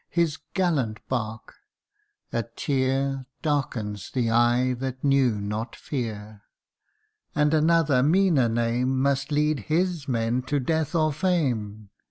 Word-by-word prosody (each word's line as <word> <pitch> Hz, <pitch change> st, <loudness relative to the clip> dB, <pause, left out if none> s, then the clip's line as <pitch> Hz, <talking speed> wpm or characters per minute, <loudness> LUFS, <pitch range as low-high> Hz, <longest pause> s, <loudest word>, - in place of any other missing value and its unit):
his 165 Hz, -3 st, 0 dB, 0.2 s
gallant 145 Hz, -, 0 dB
bark! 110 Hz, -3 st, -4 dB, 0.8 s
a 115 Hz, -, +1 dB
tear 135 Hz, +2 st, -1 dB, 0.2 s
Darkens 110 Hz, -, -2 dB
the 120 Hz, -3 st, 0 dB
eye 120 Hz, +2 st, +3 dB
that 130 Hz, +1 st, -5 dB
knew 135 Hz, -6 st, +3 dB
not 105 Hz, +3 st, -4 dB
fear. 110 Hz, -6 st, -5 dB, 0.9 s
And 150 Hz, +1 st, +2 dB
another 155 Hz, -4 st, +3 dB
meaner 155 Hz, -4 st, +3 dB
name 120 Hz, +3 st, 0 dB
Must 140 Hz, +2 st, 0 dB
lead 150 Hz, 0 st, +2 dB
his 170 Hz, -1 st, 0 dB
men 115 Hz, 0 st, 0 dB
to 145 Hz, -, +1 dB
death 160 Hz, +4 st, -1 dB
or 155 Hz, -2 st, +2 dB
fame 120 Hz, -, -1 dB
130 Hz, 120 wpm, -25 LUFS, 115-150 Hz, 0.9 s, eye